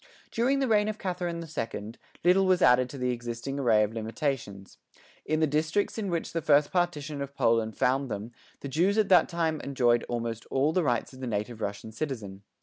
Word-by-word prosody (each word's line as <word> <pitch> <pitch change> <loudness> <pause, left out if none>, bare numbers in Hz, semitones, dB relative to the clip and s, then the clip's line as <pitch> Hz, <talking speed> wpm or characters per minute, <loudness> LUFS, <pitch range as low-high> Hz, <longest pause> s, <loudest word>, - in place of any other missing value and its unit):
During 250 +4 +2
the 270 -1 +1
reign 210 -2 +3
of 215 0 -3
Catherine 175 -3 -3
the 165 - -8
Second, 115 -6 -5 0.2
little 185 +2 +4
was 185 -1 +3
added 125 0 +5
to 140 - -8
the 125 -1 0
existing 120 +3 -4
array 115 -5 +4
of 105 +1 -2
limitations. 110 -3 -4 0.5
In 155 +1 +1
the - - +5
districts 155 +9 0
in 200 -3 -2
which 170 -2 -3
the 165 - -1
first 145 0 +3
Partition 155 -5 -1
of 140 0 -6
Poland 115 -4 +1
found 135 +1 +1
them, 110 +2 -5 0.3
the - - -5
Jews 175 +9 +1
at 215 -2 +2
that 185 - +6
time 165 -3 -1
enjoyed 120 -3 +2
almost 115 -1 -3
all 140 +4 +1
the 185 - +2
rights 125 -4 -1
of 130 - -12
the 130 - -4
native 110 +1 -3
Russian 105 +1 -4
citizen. 110 -7 -5
140 Hz, 205 wpm, -28 LUFS, 115-170 Hz, 0.5 s, that